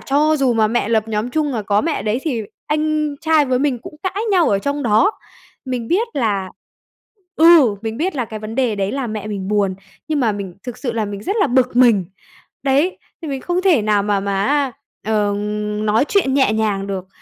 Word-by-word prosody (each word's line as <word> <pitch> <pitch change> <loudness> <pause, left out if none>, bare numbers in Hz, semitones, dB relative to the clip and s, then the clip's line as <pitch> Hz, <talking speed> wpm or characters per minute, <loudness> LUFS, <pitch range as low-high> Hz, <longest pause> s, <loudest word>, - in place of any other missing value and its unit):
cho 300 +3 +2
dù 270 -4 +2
mà 220 -1 +3
mẹ 230 -1 0
lập 225 -1 +1
nhóm 220 +2 -2
chung, 300 0 0
mà 225 -4 -2
có 205 +1 +1
mẹ 330 - -1
ở - - -3
đấy 215 +2 0
thì 250 -9 -2 0.2
anh 305 -1 0
trai 320 -2 +3
với 255 -1 +1
mình 270 -3 0
cũng - - -10
cãi 380 +3 -2
nhau 360 -4 +4
ở 200 - +2
trong 280 +7 -2
đó. 245 - +3 0.5
Mình 250 -3 -4
biết 440 +7 +1
là 205 -8 -1 0.9
ừ, 315 -10 +6
mình 225 0 -4
biết 340 +5 -2
là 250 - 0
cái 220 -1 -7
vấn 215 +1 -6
đề 250 -3 +1
đấy 195 0 -1
là 270 -2 -2
mẹ 215 -1 -5
mình 200 -3 -4
buồn, 200 -2 +1 0.3
nhưng 305 -2 0
mà 230 -4 +2
mình 200 -3 -6
thực 245 -3 -7
sự 245 -4 -3
là 225 -2 -1
mình 200 -1 -6
rất 400 +4 -2
là - - +4
bực 255 -2 +1
mình. 235 -7 +5 0.6
Đấy, 285 +7 +2 0.2
thì 320 - -5
mình 270 -2 -3
không 355 +4 -1
thể 340 - +4
nào 210 -1 +2
mà 205 -1 0
mà 195 0 -1
á, 280 -2 +1 0.3
ờ, 210 -2 +1 0.5
nói 215 +5 +3
chuyện 310 -10 +2
nhẹ 265 -6 +3
nhàng 210 -3 -1
được. 190 -2 -4
245 Hz, 225 wpm, -19 LUFS, 210-295 Hz, 0.9 s, ừ